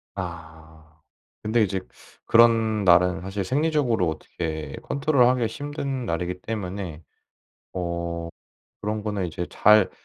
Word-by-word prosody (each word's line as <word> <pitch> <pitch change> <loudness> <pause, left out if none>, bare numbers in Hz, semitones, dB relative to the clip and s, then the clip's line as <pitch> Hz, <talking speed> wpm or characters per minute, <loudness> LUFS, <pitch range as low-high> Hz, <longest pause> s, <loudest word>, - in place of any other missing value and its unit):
아. 80 -3 -9 0.4
근데 110 +2 +1
이제 95 -2 -1 0.5
그런 115 -2 +4
날은 90 0 +4
사실 95 +1 -3
생리적으로 135 - +1
어떻게 80 0 -5
컨트롤하기가 130 -5 +3
힘든 140 0 -4
날이기 90 +1 -3
때문에 95 -6 -5 0.7
어 85 -1 -3 0.5
그런 105 +1 -2
거는 105 -3 -2
이제 85 +1 -4
잘 105 -2 +5
95 Hz, 245 characters per minute, -25 LUFS, 85-115 Hz, 0.7 s, 잘